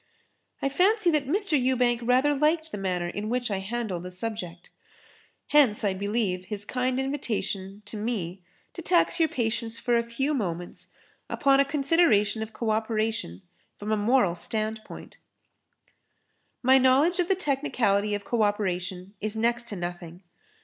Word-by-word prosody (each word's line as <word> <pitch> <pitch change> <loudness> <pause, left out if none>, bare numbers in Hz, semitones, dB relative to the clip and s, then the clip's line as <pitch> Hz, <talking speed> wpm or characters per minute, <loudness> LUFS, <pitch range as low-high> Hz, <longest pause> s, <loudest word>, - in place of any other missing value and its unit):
I - - +3
fancy 380 +5 +3
that 295 -4 0
Mr. 385 +1 +1
Ewbank 250 -2 +2
rather 255 +5 +3
liked 310 +3 +1
the - - -4
manner 180 -2 -1
in 205 +4 -4
which 245 -1 -1
I 195 - -1
handled 200 -3 -3
the 180 - -7
subject. 185 -3 -5 0.8
Hence, 280 -9 +4
I 200 -2 +1
believe, 200 -2 -1
his 205 +1 -4
kind 255 +2 -1
invitation 210 -7 -3
to 215 - -7
me 200 -5 -3 0.3
to 340 - -7
tax 345 +1 +2
your 320 -1 +3
patience 230 -2 -2
for 240 0 0
a 235 - +3
few 235 +6 -2
moments 175 - -4 0.4
upon 275 -1 +3
a 280 - +5
consideration 275 -8 +2
of 220 0 -5
co 220 0 -2
operation 215 - -1 0.3
from 210 +1 -5
a - - +3
moral 210 -3 +3
standpoint. 215 +4 -5 1.5
My 260 +1 +6
knowledge 275 +8 +4
of 350 - +2
the 385 - +2
technicality 250 - 0
of 205 -1 -6
co 235 -2 0
operation 190 -2 -1
is 215 +1 -2
next 235 +1 0
to 210 - -4
nothing. 175 0 -6
225 Hz, 155 wpm, -26 LUFS, 200-270 Hz, 1.5 s, My